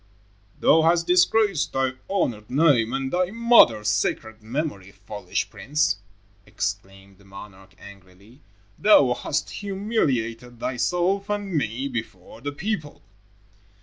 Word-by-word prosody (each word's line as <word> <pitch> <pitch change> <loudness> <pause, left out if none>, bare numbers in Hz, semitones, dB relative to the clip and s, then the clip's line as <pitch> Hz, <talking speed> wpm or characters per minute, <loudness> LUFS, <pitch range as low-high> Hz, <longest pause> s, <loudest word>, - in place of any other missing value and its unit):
"Thou 160 - +5
hast 170 +1 +3
disgraced 185 0 +2
thy 135 -1 0 0.2
honored 120 - -2
name 130 -5 +3
and 135 0 -3
thy 180 0 +1
mother's 220 - +4
sacred 110 +2 -1
memory, 110 - -4
foolish 105 +1 -5
prince," 150 +2 0 0.5
exclaimed 95 0 -6
the - - -20
monarch 95 -1 -13
angrily. 100 +5 -16 0.4
"Thou 145 -12 +5
hast 145 +4 -3
humiliated 130 - -2
thyself 180 - -1
and 205 -2 -3
me 130 -1 -1
before 115 -5 -7
the 145 +2 -4
people." 155 -1 -5
130 Hz, 115 wpm, -24 LUFS, 105-175 Hz, 0.5 s, Thou